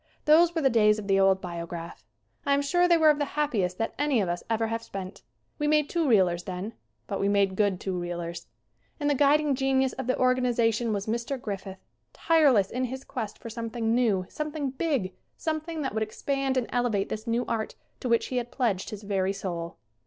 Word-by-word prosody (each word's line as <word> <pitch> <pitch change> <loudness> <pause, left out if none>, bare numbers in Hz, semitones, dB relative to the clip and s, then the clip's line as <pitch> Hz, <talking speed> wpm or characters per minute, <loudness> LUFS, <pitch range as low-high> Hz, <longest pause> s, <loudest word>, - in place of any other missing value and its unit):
Those 330 +3 +5
were 325 - 0
the 270 - +5
days 210 -2 +4
of 210 -2 -6
the 195 -1 +3
old 195 0 +4
Biograph. 170 -1 -6 0.4
I 280 -1 +3
am 285 - +1
sure 350 +5 +3
they 340 -1 +5
were 315 -1 +6
of 295 - -2
the 290 0 -3
happiest 205 -12 0
that 225 - -2
any 290 -4 +2
of 195 - 0
us 175 0 -3
ever 225 0 +1
have 225 0 -2
spent. 195 -3 -7 0.4
We 295 - 0
made 300 -1 +2
two 335 -3 +1
reelers 185 -7 +3
then. 190 +4 -5 0.3
But - - -3
we 200 - +1
made 200 -2 +2
good 200 -2 +1
two 190 - -3
reelers. 175 -1 -5 0.5
And 290 - -1
the - - +4
guid 285 +2 +4
ing 295 -2 +1
genius 265 -1 +1
of 260 -1 -5
the 255 - +1
organization 240 -3 +2
was 200 -1 -2
Mr. 235 +4 -2
Griffith, 195 -4 -6 0.3
tireless 280 - +3
in 255 +1 -1
his 260 +2 -6
quest 225 -6 -5
for 230 - -8
something 230 0 -2
new, 220 -7 +2
some 305 0 -4
thing 290 -3 -3
big, 265 - -1 0.2
something 315 0 -3
that 265 - -2
would 220 - -1
expand 270 +5 -1
and 250 - +1
elevate 240 -5 0
this 220 +2 -5
new 235 +2 0
art 220 -1 -3 0.2
to 250 - -3
which 235 -1 +2
he 255 - -2
had 240 -1 -2
pledged 220 -8 -1
his 210 -1 -8
very 195 -2 0
soul. 170 -4 -5
230 Hz, 215 wpm, -27 LUFS, 195-275 Hz, 0.5 s, were